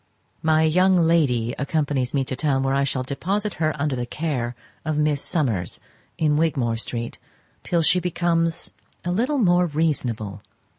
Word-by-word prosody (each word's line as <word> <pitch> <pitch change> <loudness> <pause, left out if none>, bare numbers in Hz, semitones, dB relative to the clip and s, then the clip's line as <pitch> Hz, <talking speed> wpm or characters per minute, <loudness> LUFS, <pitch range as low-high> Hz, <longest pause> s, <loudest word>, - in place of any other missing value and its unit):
My 160 0 +3
young 185 +4 +4
lady 145 -9 +2
accompanies 140 -3 0
me 140 -2 +1
to 130 - -3
town, 135 -1 +1
where 135 0 +1
I 140 0 +2
shall 135 -1 -1
deposit 190 +10 -2
her 155 -1 0
under 145 -2 0
the 120 -1 -3
care 125 -6 -2 0.3
of 155 -1 -1
Miss 150 -2 +1
Summers, 115 - 0 0.4
in 150 -2 +2
Wigmore 135 -8 +1
street, 115 0 -5 0.4
till 170 -2 +1
she 180 +3 +4
becomes 170 -1 0 0.3
a 175 - 0
little 250 +10 +1
more 180 -6 +4
reasonable. 125 - -1
150 Hz, 155 wpm, -23 LUFS, 130-165 Hz, 0.4 s, young